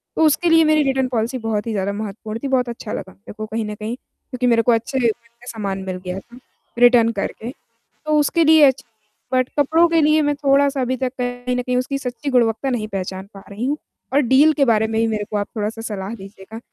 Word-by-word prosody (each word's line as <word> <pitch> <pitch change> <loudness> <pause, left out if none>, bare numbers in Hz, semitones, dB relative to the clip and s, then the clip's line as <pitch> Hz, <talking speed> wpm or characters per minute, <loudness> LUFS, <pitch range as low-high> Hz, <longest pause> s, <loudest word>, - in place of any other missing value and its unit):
तो - - 0
उसके 330 +3 +2
लिए 325 0 +6
मेरी 310 0 +4
रिटर्न 265 -1 +1
पॉलिसी 240 +1 -1
बहुत 225 -2 -3
ही - - -1
ज़्यादा 200 -1 -1
महत्वपूर्ण 215 +1 -6
थी, - - -1
बहुत 255 -2 +1
अच्छा 235 -2 -6
लगा 190 - -6
मेरे 200 - -13
को 215 - -4
कहीं 220 +1 -3
न 210 0 -5
कहीं 215 +3 -5
क्योंकि 255 -1 -6
मेरे 230 -1 +4
को 240 - +2
अच्छे 230 +4 0
रेट 235 -3 +3
में 235 +1 -22
सामान 200 -5 -4
मिल 185 - -3
गया 180 +1 -4
था 240 +5 -16 0.4
रिटर्न 240 -2 +6
करके। 220 +3 -4 0.6
तो 305 0 +2
उसके 325 +3 +2
लिए 315 0 +6
अच्छी 265 -2 +3 0.5
बट 255 0 +2
कपड़ों 320 +4 +4
के 330 -1 +3
लिए 305 +1 +4
मैं 290 0 +1
थोड़ा-सा 280 0 +2
अभी 255 0 -1
तक 255 0 -2
कहीं 245 0 -2
न 250 - -1
कहीं 250 0 -1
उसकी 275 +2 -1
सच्ची 265 +2 -5
गुणवत्ता 245 +1 +1
नहीं 220 -4 -2
पहचान 190 -1 -5
पा 195 - -12
रही 210 +5 -4
हूँ 290 +2 0 0.4
और 285 - +5
डील 295 +4 +6
के - - +6
बारे 220 -3 +2
में 225 0 -1
ही 225 - +2
मेरे 215 -2 -2
को 210 - -2
आप 205 - -2
थोड़ा-सा 215 +2 -3
सलाह 205 -1 -5
दीजिएगा 195 +1 -11
240 Hz, 235 wpm, -20 LUFS, 215-270 Hz, 0.6 s, लिए